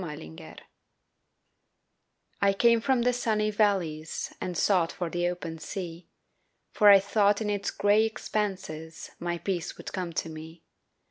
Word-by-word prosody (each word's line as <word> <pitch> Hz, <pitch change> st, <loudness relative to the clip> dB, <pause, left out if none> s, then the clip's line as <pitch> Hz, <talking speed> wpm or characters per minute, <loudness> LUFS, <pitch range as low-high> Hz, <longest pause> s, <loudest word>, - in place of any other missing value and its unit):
THE 150 Hz, -4 st, -6 dB, 0.2 s
RIVER -, -, -11 dB, 1.9 s
I 200 Hz, 0 st, +4 dB
CAME 230 Hz, +3 st, +4 dB
from 260 Hz, -1 st, +2 dB
the 250 Hz, +1 st, +2 dB
sunny 215 Hz, -3 st, 0 dB
valleys 180 Hz, -7 st, -1 dB
And 180 Hz, -2 st, -3 dB
sought 180 Hz, -4 st, +2 dB
for 175 Hz, -2 st, -4 dB
the 175 Hz, 0 st, 0 dB
open 170 Hz, -2 st, -5 dB
sea, 170 Hz, +1 st, -7 dB, 0.6 s
For 210 Hz, -2 st, +5 dB
I 200 Hz, -1 st, +9 dB
thought 205 Hz, +1 st, +2 dB
in 210 Hz, -2 st, -1 dB
its 200 Hz, -1 st, -1 dB
gray 205 Hz, +2 st, +3 dB
expanses 190 Hz, -8 st, -4 dB
My 175 Hz, 0 st, -2 dB
peace 180 Hz, -1 st, -3 dB
would -, -, -8 dB
come 180 Hz, -3 st, -3 dB
to 165 Hz, -, -2 dB
me. 160 Hz, +1 st, -10 dB
190 Hz, 145 wpm, -28 LUFS, 165-210 Hz, 1.9 s, I